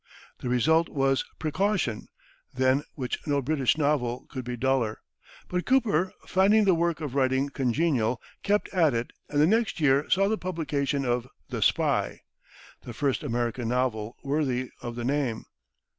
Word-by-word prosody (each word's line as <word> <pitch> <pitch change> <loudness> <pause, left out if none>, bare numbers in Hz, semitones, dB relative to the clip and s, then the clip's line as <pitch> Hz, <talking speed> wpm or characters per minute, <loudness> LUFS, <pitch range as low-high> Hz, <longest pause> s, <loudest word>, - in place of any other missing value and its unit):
The 125 - -4
result 160 +7 +3
was 135 -1 +1
"Precaution," 160 - -1 0.5
than 130 +2 +2
which 130 -4 -3
no 145 -1 +2
British 140 0 +1
novel 135 -4 0
could 130 - -5
be 120 0 -5
duller. 125 -3 0 0.5
But 180 0 -2
Cooper, 215 -9 +2
finding 200 +3 +4
the 190 - +5
work 170 -1 0
of 145 -5 -4
writing 135 0 +1
congenial, 130 -3 0 0.2
kept 205 +1 +1
at 165 -9 +2
it, 115 +1 -2 0.2
and 145 - 0
the 150 - +6
next 220 +2 +1
year 140 -1 +3
saw 195 +2 +3
the 220 +1 0
publication 145 -6 -1
of 120 0 0 0.2
"The - - -4
Spy," - - +1 0.6
the - - -8
first 135 -5 0
American 120 0 -2
novel 120 -3 -1
worthy 135 -3 -1
of 120 -1 -5
the 120 -1 -4
name. 130 -4 -1
140 Hz, 155 wpm, -27 LUFS, 125-165 Hz, 0.6 s, the